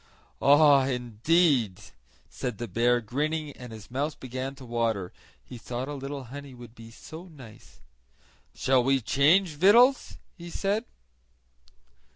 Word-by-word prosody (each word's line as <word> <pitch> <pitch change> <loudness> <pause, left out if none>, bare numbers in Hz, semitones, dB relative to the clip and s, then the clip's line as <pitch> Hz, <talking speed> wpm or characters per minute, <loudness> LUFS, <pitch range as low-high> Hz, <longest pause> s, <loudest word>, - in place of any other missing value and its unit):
"Ah, 145 -2 +5
indeed," 125 - +1 0.5
said 125 -5 -5
the 120 - -5
bear, 120 +4 +2
grinning, 150 +6 -3
and 125 -3 -11
his 110 0 -12
mouth 145 +4 -3
began 130 +1 -5
to 135 -2 -12
water, 115 -6 -2 0.3
he 125 - -10
thought 125 +3 -5
a 145 - -5
little 140 0 -6
honey 135 +2 -10
would 120 -2 -13
be 115 -1 -13
so 160 +8 -11
nice. 130 -11 -15 0.7
"Shall 130 -1 +2
we 135 +1 +2
change 155 - +3
victuals?" 200 - +4 0.2
he 170 0 -10
said. 205 +6 -2
135 Hz, 135 wpm, -27 LUFS, 120-150 Hz, 0.7 s, Ah